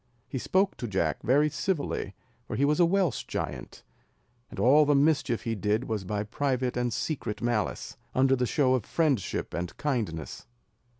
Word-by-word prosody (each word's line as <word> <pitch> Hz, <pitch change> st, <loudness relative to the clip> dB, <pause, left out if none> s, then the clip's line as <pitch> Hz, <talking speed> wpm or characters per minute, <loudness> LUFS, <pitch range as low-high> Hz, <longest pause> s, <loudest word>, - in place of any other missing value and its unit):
He 130 Hz, -, -4 dB
spoke 190 Hz, +8 st, +1 dB
to 120 Hz, -, -4 dB
Jack 85 Hz, -8 st, -1 dB
very 140 Hz, +6 st, +3 dB
civilly, 145 Hz, -, -2 dB, 0.3 s
for -, -, -4 dB
he 140 Hz, -, +2 dB
was 150 Hz, +3 st, +2 dB
a 175 Hz, -, +6 dB
Welsh 185 Hz, -, +1 dB
giant, -, -, -5 dB, 0.7 s
and -, -, -11 dB
all 135 Hz, +8 st, +6 dB
the 145 Hz, 0 st, +3 dB
mischief 140 Hz, -4 st, +2 dB
he 115 Hz, -, -1 dB
did 105 Hz, +2 st, 0 dB
was 110 Hz, -6 st, -3 dB
by 105 Hz, +2 st, -2 dB
private 130 Hz, +2 st, -1 dB
and 125 Hz, 0 st, 0 dB
secret 115 Hz, -3 st, -3 dB
malice, 120 Hz, -5 st, -2 dB, 0.2 s
under 135 Hz, +1 st, +4 dB
the 125 Hz, -1 st, 0 dB
show 135 Hz, -2 st, +2 dB
of 130 Hz, -4 st, +1 dB
friendship 145 Hz, -, -1 dB
and 85 Hz, 0 st, -4 dB
kindness. 115 Hz, -, -3 dB
130 Hz, 170 wpm, -28 LUFS, 105-145 Hz, 0.7 s, a